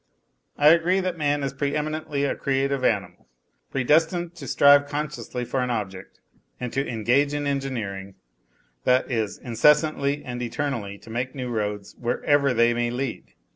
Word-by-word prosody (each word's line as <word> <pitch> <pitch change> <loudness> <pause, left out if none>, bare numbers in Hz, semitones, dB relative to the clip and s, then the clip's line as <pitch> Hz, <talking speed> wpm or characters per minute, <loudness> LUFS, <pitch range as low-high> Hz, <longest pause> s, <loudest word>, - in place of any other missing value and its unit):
I 145 +1 +6
agree 170 +3 +4
that 185 -2 -2
man 145 -2 0
is 135 -1 -2
pre 140 +1 -2
eminently 150 -1 -2
a 140 - 0
creative 135 0 -1
animal, 100 -5 -1 0.4
predestined 165 +6 +1
to 140 -5 -8
strive 145 +2 +6
consciously 135 -5 -4
for 130 +2 -1
an 125 - -1
object 100 -5 -5 0.4
and 125 -1 -5
to 135 - +1
engage 130 +5 +1
in 145 0 -2
engineering 110 -9 -3 0.7
that 130 +1 +2
is, 110 -5 -1
incessantly 145 +3 +2
and 125 -1 -5
eternally 120 -5 -3
to 110 - -13
make 125 +3 -3
new 130 -2 -4
roads, 105 -3 -3
wherever 140 +3 +2
they 120 0 +3
may 120 0 0
lead. 125 +1 -5
135 Hz, 155 wpm, -24 LUFS, 120-145 Hz, 0.7 s, I